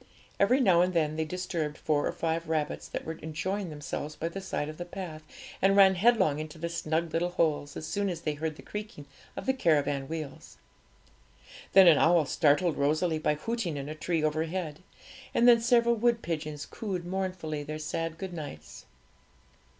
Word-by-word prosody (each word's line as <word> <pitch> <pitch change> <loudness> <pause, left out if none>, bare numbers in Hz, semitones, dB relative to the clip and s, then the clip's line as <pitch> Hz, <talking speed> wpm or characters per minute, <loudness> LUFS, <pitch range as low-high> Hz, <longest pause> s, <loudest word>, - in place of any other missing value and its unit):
Every 245 +7 +4
now 185 -9 +5
and 180 0 +1
then 155 -2 +1
they 160 0 -1
disturbed 165 -3 -3
four 150 -2 0
or - - -1
five 165 0 -2
rabbits 155 -2 -1
that - - -5
were 160 0 -5
enjoying 175 +5 -3
themselves 150 0 -5
by 165 - -3
the 195 +3 -6
side 190 -6 -3
of 155 0 -7
the 175 - -4
path, 175 -3 -7 0.4
and 195 +1 +4
ran 195 -1 +7
headlong 190 -7 +3
into 155 +1 -7
their 170 +1 -4
snug 165 0 -1
little 175 +2 +1
holes 155 -5 0
as 155 - -5
soon 200 +3 -1
as 170 -3 -4
they 155 -2 -1
heard 155 +1 -3
the - - -13
creaking 210 -8 -7 0.3
of - - -5
the 265 - +2
caravan 145 - +1
wheels. 155 -2 -7 1.2
Then 195 0 +9
an 160 -4 +7
owl 165 -1 +4
startled 155 +3 +2
Rosalie 155 +3 +1
by 150 -1 +1
hooting 185 -1 -3
in 140 0 -5
a 155 - -4
tree 160 0 -1
overhead, 155 +1 -2 0.6
and 240 - +5
then 235 -1 +7
several 235 0 +4
wood 235 0 +1
pigeons 155 -3 -4
cooed 190 -6 -5
mournfully 180 -5 -3
their 155 +1 -5
sad 165 +1 -3
good 190 -1 -6
nights. 80 - -9
165 Hz, 185 wpm, -29 LUFS, 155-185 Hz, 1.2 s, Then